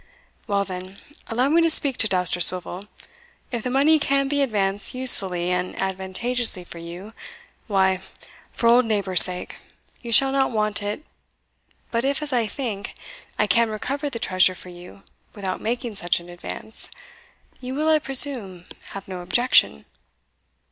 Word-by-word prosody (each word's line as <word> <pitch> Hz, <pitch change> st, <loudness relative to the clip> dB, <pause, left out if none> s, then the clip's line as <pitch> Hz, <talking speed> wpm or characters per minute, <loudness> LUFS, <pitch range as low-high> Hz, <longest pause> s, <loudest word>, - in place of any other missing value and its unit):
"Well, 200 Hz, -1 st, 0 dB
then, 185 Hz, +1 st, -9 dB, 0.3 s
allow 245 Hz, +3 st, 0 dB
me 330 Hz, +3 st, +3 dB
to 330 Hz, -, +2 dB
speak 280 Hz, -4 st, +2 dB
to 220 Hz, -, +4 dB
Dousterswivel. 180 Hz, +1 st, -2 dB, 0.6 s
If 240 Hz, -2 st, -3 dB
the 250 Hz, -, -4 dB
money 285 Hz, +5 st, +3 dB
can 275 Hz, -1 st, +1 dB
be 285 Hz, +1 st, 0 dB
advanced 205 Hz, -4 st, 0 dB
usefully 190 Hz, -9 st, +3 dB
and 180 Hz, 0 st, -3 dB
advantageously 190 Hz, +3 st, +1 dB
for 170 Hz, -1 st, -11 dB
you, 175 Hz, +6 st, -10 dB, 0.5 s
why, 190 Hz, -3 st, +1 dB, 0.5 s
for -, -, -5 dB
old 240 Hz, +1 st, +5 dB
neighbourhood's 200 Hz, -5 st, +6 dB
sake, 180 Hz, -1 st, -6 dB, 0.4 s
you 235 Hz, -, -7 dB
shall 270 Hz, +3 st, +7 dB
not 270 Hz, -1 st, +1 dB
want 215 Hz, -3 st, -1 dB
it 205 Hz, +9 st, -5 dB, 0.9 s
but 230 Hz, 0 st, -1 dB
if, 280 Hz, +2 st, -1 dB
as 290 Hz, -3 st, -4 dB
I 235 Hz, -3 st, +1 dB
think, 210 Hz, -4 st, -6 dB, 0.4 s
I 210 Hz, -, +2 dB
can 230 Hz, +3 st, +2 dB
recover 275 Hz, +7 st, -4 dB
the 240 Hz, -, -6 dB
treasure 185 Hz, -4 st, +2 dB
for 180 Hz, -, -11 dB
you 180 Hz, +2 st, -14 dB, 0.3 s
without 195 Hz, -3 st, -5 dB
making 235 Hz, +1 st, -3 dB
such 175 Hz, -3 st, -1 dB
an 170 Hz, +1 st, -14 dB
advance, 175 Hz, +5 st, -8 dB, 0.7 s
you 255 Hz, +1 st, -7 dB
will, 305 Hz, +2 st, -1 dB
I 315 Hz, -1 st, +4 dB
presume, 250 Hz, -11 st, +1 dB, 0.3 s
have 195 Hz, -1 st, -9 dB
no 185 Hz, -1 st, -7 dB
objection!" 180 Hz, -, +2 dB
210 Hz, 155 wpm, -22 LUFS, 185-255 Hz, 0.9 s, shall